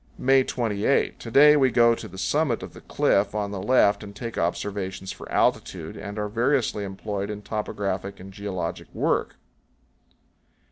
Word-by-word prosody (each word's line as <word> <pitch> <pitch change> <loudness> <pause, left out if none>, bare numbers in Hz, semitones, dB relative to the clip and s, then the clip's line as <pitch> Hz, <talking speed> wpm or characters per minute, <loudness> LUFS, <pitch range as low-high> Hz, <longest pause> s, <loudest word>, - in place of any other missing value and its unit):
May 135 0 +4
28. 115 0 0
To 115 - -7
day 150 +5 +7
we 135 -3 +4
go 120 0 +5
to - - -6
the 95 - -12
summit 140 +5 0
of - - -9
the - - -12
cliff 100 +1 +1
on 105 -1 -2
the 100 -2 -4
left 105 -2 +3
and 100 -1 -10
take 115 +2 -6
observations 95 +2 -3
for - - -10
altitude, - - 0
and 100 +1 -7
are 105 0 -1
variously 115 -1 0
employed 100 +1 -4
in 105 0 -6
topographic 100 -2 -3
and 95 +1 -11
geologic 95 -4 -4
work. - - 0
105 Hz, 160 wpm, -25 LUFS, 100-120 Hz, -, day